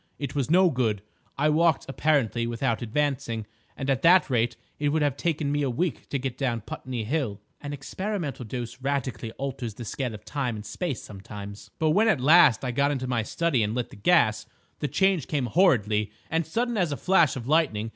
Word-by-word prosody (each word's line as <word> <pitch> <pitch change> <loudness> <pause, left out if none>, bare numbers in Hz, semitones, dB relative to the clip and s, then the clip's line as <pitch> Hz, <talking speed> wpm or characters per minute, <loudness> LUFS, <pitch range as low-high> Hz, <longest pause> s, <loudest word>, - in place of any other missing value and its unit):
It 140 -3 -4
was 140 -2 -1
no 180 +1 +5
good. 110 -7 0 0.3
I 150 +2 +3
walked 160 -1 +3
apparently 135 -5 +1
without 115 0 -1
advancing, 120 -2 -1 0.3
and 135 - -4
at 135 -1 +1
that 180 -3 +5
rate 120 -1 +1 0.2
it 145 0 +1
would 155 +1 +1
have 145 -3 +1
taken 150 -2 -1
me 145 0 0
a 140 - +1
week 150 +2 -2
to 140 - -1
get 130 -1 -4
down 120 -5 -1
Putney 115 +2 -5
Hill." 120 -4 -2 0.2
"An 145 - -5
experimental 150 +1 -4
dose 120 +2 -6
radically 130 -5 -2
alters 130 -5 -5
the 120 - -7
scale 125 0 -3
of 105 +1 -13
time 125 -1 -2
and 105 0 -8
space 135 - -4
sometimes—" 100 0 -9
"But, 155 -1 +2
when 210 +7 +4
at 195 -11 +3
last 145 -2 +6
I 125 - -1
got 140 +3 +2
into 135 -3 -2
my 125 -2 0
study 150 +3 0
and 105 +1 -1
lit 125 -1 -3
the - - -11
gas, 110 -3 +3 0.3
the 150 - -1
change 190 -2 +1
came 145 -4 -1
horridly, 110 - +2 0.2
and 160 -1 0
sudden 235 +6 -1
as 175 -6 +1
a 145 - -2
flash 170 -6 +3
of 120 -2 -6
lightning. 135 -9 +1
135 Hz, 205 wpm, -26 LUFS, 115-155 Hz, 0.3 s, last